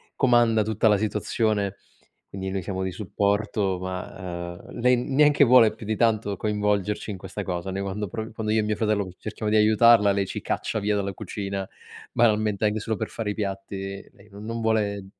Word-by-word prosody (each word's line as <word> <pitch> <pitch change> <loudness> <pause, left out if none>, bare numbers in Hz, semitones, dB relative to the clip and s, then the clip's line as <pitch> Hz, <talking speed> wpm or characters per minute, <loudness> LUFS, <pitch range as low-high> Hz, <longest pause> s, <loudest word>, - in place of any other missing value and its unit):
comanda 120 -4 +4
tutta 110 +1 +1
la 105 -1 +5
situazione, 105 -1 -1 0.5
quindi 95 0 -5
noi 95 0 -2
siamo 95 +1 -4
di 95 - -1
supporto, 100 0 -1
ma 90 -1 -6
ehm, - - -9
lei 125 +1 +4
neanche 145 +3 +4
vuole 120 -3 +6
più 110 - -10
di 110 - 0
tanto 110 -3 +1
coinvolgerci 105 0 -1
in 95 - -6
questa 95 +2 -6
cosa. 90 0 -3
Noi 95 +1 -3
quando 100 +1 -3
pro 110 +5 -6
quando 110 -1 -2
io 110 - +3
e - - -1
mio 105 0 -1
fratello 105 -3 0
cerchiamo 110 0 -4
di 110 - +3
aiutarla, 110 0 +6
lei 100 0 0
ci - - -5
caccia - - -2
via 105 +1 0
dalla 100 -1 -2
cucina, 100 0 -4 0.5
banalmente 110 -3 +2
anche 105 +1 0
solo 110 +1 -2
per - - -3
fare 110 -3 -4
i - - -3
piatti, 100 -1 -5
lei 100 - -20
non 100 +1 -10
non 115 +1 -4
vuole, 105 -3 0
105 Hz, 195 wpm, -25 LUFS, 100-110 Hz, 0.5 s, vuole